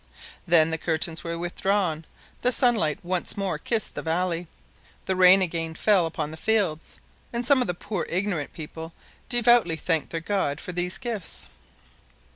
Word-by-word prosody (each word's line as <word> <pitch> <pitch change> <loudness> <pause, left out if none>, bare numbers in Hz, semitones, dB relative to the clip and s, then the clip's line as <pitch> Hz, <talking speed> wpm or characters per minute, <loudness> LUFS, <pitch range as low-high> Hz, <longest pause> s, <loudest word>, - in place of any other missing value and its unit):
Then 165 -1 +5
the 160 - -2
curtains 160 0 0
were 170 0 -4
withdrawn, 175 -1 -1 0.3
the 250 - +1
sunlight 230 - +2
once 180 +2 -2
more 195 -2 -2
kissed 225 -3 -2
the - - -4
valley, 170 +1 -1 0.6
the 190 - 0
rain 185 +1 +7
again 165 -2 -3
fell 190 -2 +3
upon 155 -2 -4
the 160 - -8
fields, 185 -5 -1 0.3
and 235 0 -3
some 270 +1 +4
of 250 - 0
the 180 - -1
poor, 200 0 -4
ignorant 180 -5 -1
people 160 +1 -8 0.4
devoutly 240 -7 +4
thanked 160 -2 -1
their 165 - -3
God 165 -5 -1
for 180 - -6
these 180 +1 -1
gifts. 220 - -4
175 Hz, 160 wpm, -25 LUFS, 160-205 Hz, 0.6 s, rain